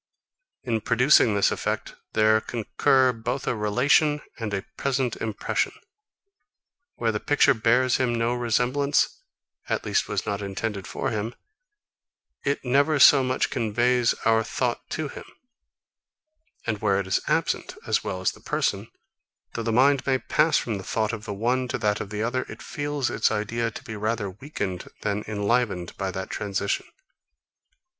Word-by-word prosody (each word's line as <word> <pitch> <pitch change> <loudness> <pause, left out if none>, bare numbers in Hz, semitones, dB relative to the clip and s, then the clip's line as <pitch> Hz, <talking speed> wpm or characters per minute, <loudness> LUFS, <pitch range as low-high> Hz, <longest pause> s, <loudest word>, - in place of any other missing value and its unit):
In 115 -4 -1
producing 115 -1 +4
this 100 - +3
effect, - - -3 0.2
there 110 0 +4
concur 125 +3 +2
both 115 +4 -3
a - - 0
relation 130 +8 +3 0.2
and 110 -3 -3
a 100 -1 -3
present 130 -3 0
impression. 110 -2 -1 1.2
Where 115 -1 0
the 105 - -2
picture 145 +2 +4
bears 120 +2 +3
him 125 -2 +1
no 115 +1 +1
resemblance, 125 - +1 0.5
at - - -1
least 430 - +1
was - - -1
not 100 -1 -2
intended 100 0 -4
for - - -3
him, 110 +2 -3 1.1
it 140 -1 -1
never 140 +5 +3
so 140 0 +8
much 130 0 0
as - - -8
conveys 120 +2 +2
our 115 0 +4
thought 120 +1 -2
to 155 -1 -3
him: - - -9 1.4
And 110 -3 -2
where 100 -2 +2
it 100 - -2
is 95 - +1
absent, - - 0
as - - +1
well 95 - -4
as 95 - +2
the - - -16
person, - - -1 0.6
though 115 - -3
the 115 0 -1
mind 135 +4 +3
may 130 -1 +3
pass 155 +4 +2
from 110 -4 -2
the - - -8
thought 110 +3 -1
of 110 -1 -6
the 105 - -4
one 125 +5 0
to 135 - -2
that 105 -3 0
of 100 - -6
the 105 +1 -3
other, 125 +3 0
it - - -9
feels 145 -3 -2
its 110 - +2
idea 115 +2 -1
to 110 - -10
be 110 - -7
rather 105 -1 -2
weakened 100 -5 -5
than 100 +1 -1
enlivened 105 -3 0
by 95 -1 -2
that 95 0 -5
transition. 100 -1 -2
115 Hz, 165 wpm, -25 LUFS, 105-130 Hz, 1.4 s, so